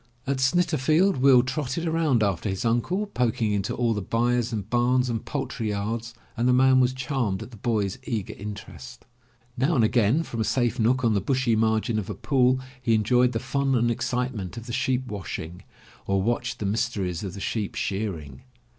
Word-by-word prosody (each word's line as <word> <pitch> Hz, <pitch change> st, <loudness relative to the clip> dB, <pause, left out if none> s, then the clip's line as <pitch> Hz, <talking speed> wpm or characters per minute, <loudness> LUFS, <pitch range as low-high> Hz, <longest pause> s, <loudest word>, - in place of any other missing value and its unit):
At 140 Hz, 0 st, 0 dB
Snitterfield 160 Hz, +3 st, +2 dB
Will 130 Hz, -1 st, +6 dB
trotted 135 Hz, +4 st, -3 dB
around 160 Hz, -8 st, +2 dB
after 100 Hz, 0 st, -1 dB
his 95 Hz, +4 st, -3 dB
uncle, 120 Hz, -, +1 dB
poking 120 Hz, -, 0 dB
into 100 Hz, -2 st, -1 dB
all 120 Hz, -2 st, +1 dB
the 105 Hz, -, -3 dB
byres 120 Hz, +3 st, 0 dB
and 105 Hz, -3 st, -4 dB
bams 125 Hz, +1 st, +2 dB
and 115 Hz, -2 st, -3 dB
poultry 130 Hz, -5 st, -3 dB
yards, 110 Hz, +3 st, -3 dB, 0.2 s
and 120 Hz, 0 st, 0 dB
the 125 Hz, -, +4 dB
man 130 Hz, +1 st, +5 dB
was 125 Hz, 0 st, +3 dB
charmed 130 Hz, -7 st, -2 dB
at -, -, -12 dB
the 115 Hz, -, -12 dB
boy's 105 Hz, -3 st, -1 dB
eager 110 Hz, -5 st, -3 dB
interest. 85 Hz, -11 st, -9 dB, 0.5 s
Now 135 Hz, +7 st, +1 dB
and 120 Hz, -, +3 dB
again 115 Hz, +7 st, +3 dB
from 115 Hz, -7 st, -4 dB
a -, -, +2 dB
safe 120 Hz, +1 st, 0 dB
nook 125 Hz, +3 st, +2 dB
on 115 Hz, -, +3 dB
the 100 Hz, -, +1 dB
bushy 130 Hz, 0 st, +1 dB
margin 110 Hz, +1 st, +1 dB
of 100 Hz, -, -6 dB
a -, -, -4 dB
pool, 130 Hz, -2 st, +2 dB, 0.2 s
he 115 Hz, -3 st, +2 dB
enjoyed 125 Hz, +4 st, +3 dB
the 115 Hz, -, -1 dB
fun 135 Hz, +1 st, 0 dB
and 120 Hz, 0 st, +2 dB
excitement 120 Hz, -5 st, -3 dB
of 115 Hz, -, -7 dB
the 120 Hz, -, -6 dB
sheep 130 Hz, +1 st, 0 dB
washing, 95 Hz, -5 st, -6 dB, 0.5 s
or 95 Hz, 0 st, +2 dB
watched 120 Hz, +4 st, -1 dB
the 105 Hz, -, -4 dB
mys 115 Hz, +5 st, 0 dB
teries 90 Hz, -6 st, -3 dB
of 95 Hz, -2 st, -5 dB
the -, -, -7 dB
sheep 105 Hz, 0 st, -3 dB
shearing. 90 Hz, -10 st, -4 dB
120 Hz, 195 wpm, -25 LUFS, 105-130 Hz, 0.5 s, Will